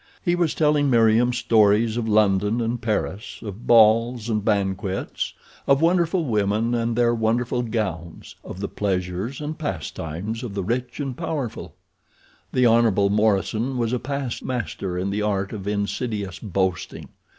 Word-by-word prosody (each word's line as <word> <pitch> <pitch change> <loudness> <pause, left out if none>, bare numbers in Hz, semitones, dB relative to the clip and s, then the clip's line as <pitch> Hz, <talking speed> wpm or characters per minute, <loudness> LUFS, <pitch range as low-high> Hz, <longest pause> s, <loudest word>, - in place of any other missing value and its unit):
He 175 - +3
was 175 -3 +1
telling 150 -2 +2
Meriem 115 0 +4
stories 110 -2 +3
of 120 -2 -2
London 105 +1 +3
and 120 +1 -2
Paris, 110 -1 -2
of 105 +1 -8
balls 115 +1 +4
and 105 -2 0
banquets, 95 -2 -1 0.3
of 140 - +5
the 160 - +2
wonderful 170 0 +2
women 110 0 0
and 115 -1 0
their 120 0 +3
wonderful 120 +2 0
gowns, 100 -8 -4
of 95 - -8
the 100 - -2
pleasures 95 +5 -2
and 150 +1 -5
pastimes 90 - -4
of 115 -6 -6
the 100 - -2
rich 120 +8 -3
and 135 -3 -3
powerful. 120 - -4 0.8
The 125 - +3
Hon. 115 -4 +4
Morison 110 +4 +1
was 115 0 0
a 125 - 0
past 140 -2 -4
master 95 -6 -3
in 95 +2 -2
the 105 +1 -1
art 100 -1 -1
of 100 -2 -6
insidious 100 -2 -2
boasting. 95 -3 -2
110 Hz, 150 wpm, -23 LUFS, 100-120 Hz, 0.8 s, of